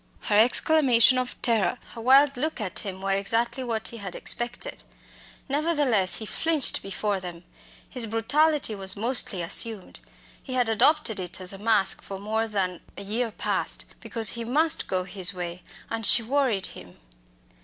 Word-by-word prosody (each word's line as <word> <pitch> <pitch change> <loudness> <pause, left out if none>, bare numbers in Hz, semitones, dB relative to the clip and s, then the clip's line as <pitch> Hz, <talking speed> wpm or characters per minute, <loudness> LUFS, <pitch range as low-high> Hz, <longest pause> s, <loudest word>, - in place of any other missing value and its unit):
Her 205 - -1
exclamation 255 +2 +4
of 250 0 -5
terror, 230 0 +1 0.2
her 230 - -9
wild 275 +4 +4
look 310 +4 -3
at 200 -4 -3
him, 190 -2 -7
were 195 - -1
exactly 225 +6 0
what 225 -2 -3
he 235 - -9
had 195 -4 -8
expected; 240 0 +1 0.7
nevertheless, 285 - +1
he 220 - -4
flinched 315 +4 +1
before 200 0 -3
them. 175 -2 -9 0.4
His 245 -4 -1
brutality 265 +5 +1
was 195 -1 -4
mostly 215 -4 -1
assumed. 205 +3 +1 0.4
He 260 - -8
had 245 -3 +1
adopted 225 0 +2
it 180 0 -5
as 185 0 -2
a 195 - -10
mask 215 -2 +1
for 195 - -8
more 220 +3 -2
than 190 -4 -3 0.2
a - - -7
year 225 +4 -2
past, 210 - -2
because 225 -4 +3
he 235 - -2
must 300 +8 +1
go 185 -1 -2
his 185 0 0
way, 175 0 -6 0.3
and 225 0 -5
she 230 +3 +5
worried 240 -6 0
him. 90 - -14
225 Hz, 165 wpm, -25 LUFS, 195-255 Hz, 0.7 s, she